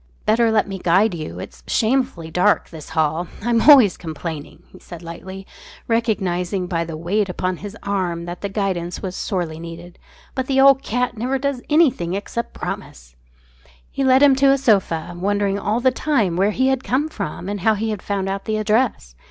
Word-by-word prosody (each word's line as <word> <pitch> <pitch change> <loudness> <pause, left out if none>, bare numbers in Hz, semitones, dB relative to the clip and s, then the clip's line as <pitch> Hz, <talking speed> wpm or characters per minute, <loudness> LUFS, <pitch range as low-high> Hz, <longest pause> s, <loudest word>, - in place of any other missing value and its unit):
"Better 230 +1 +3
let 215 -2 +2
me 195 -1 -5
guide 185 +4 +3
you. 155 - -6
It's 65 -8 -9
shamefully 225 -9 0
dark 180 +5 +2
this 160 -3 -10
hall. 160 +2 0 0.2
I'm 235 0 +2
always 255 - +8
complaining," 160 0 -7
he - - -17
said 175 -1 -11
lightly, 190 +3 -8 0.4
recognising 195 -5 0
by 170 -2 -2
the 160 -1 -6
weight 190 +5 0
upon 185 0 -2
his 205 +4 -8
arm 180 -4 -2
that 175 +1 -7
the 200 - -3
guidance 190 -4 -2
was 185 -1 -4
sorely 170 -5 -3
needed, 170 +1 -10 0.3
"but 260 -1 -3
the 270 -1 +2
old 270 0 +6
cat 245 0 -2
never 255 +4 0
does 275 -2 -2
anything 270 - +2
except 225 +3 -4
promise." - - -7 0.8
He 275 - -2
led 265 +1 +5
him 280 -2 +6
to 275 +1 +4
the 275 0 +5
sofa, 195 -10 +1
wondering 200 +2 0
all 210 +3 0
the 260 +1 +3
time 245 - 0
where 195 +3 +2
he 260 +5 +1
had 265 -1 0
come 270 +5 0
from 195 - -6
and 205 0 -3
how 220 +4 +3
he 220 +2 -2
had 210 -3 -4
found 195 -2 -2
out 195 0 -3
the 215 -1 -1
address. 215 - 0
200 Hz, 190 wpm, -21 LUFS, 175-235 Hz, 0.8 s, always